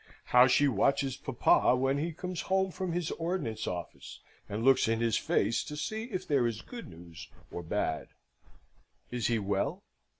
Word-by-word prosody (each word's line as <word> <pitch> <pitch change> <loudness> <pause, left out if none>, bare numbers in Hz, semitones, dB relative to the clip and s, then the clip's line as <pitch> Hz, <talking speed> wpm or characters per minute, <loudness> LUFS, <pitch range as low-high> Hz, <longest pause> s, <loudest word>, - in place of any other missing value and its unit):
How 125 +1 +8
she 145 +3 +4
watches 135 +3 +1
papa - - +3
when 135 +2 +1
he 165 +3 -1
comes 180 +2 -5
home 190 0 +2
from 185 0 -3
his 170 -1 -2
Ordnance 165 - -2
Office, 85 -3 -6 0.3
and 105 +2 -3
looks 135 -3 +5
in 115 0 +1
his 115 -1 +1
face 115 - +1
to 150 - -6
see 220 +8 -3
if 200 -7 -5
there 135 -5 +3
is 115 -1 -4
good 240 -2 -9
news 85 0 -11 0.2
or 85 - -5
bad! 80 -2 -2 1.0
Is 120 -2 -1
he 115 - +2
well? 100 -1 -1
130 Hz, 170 wpm, -30 LUFS, 110-170 Hz, 1.0 s, How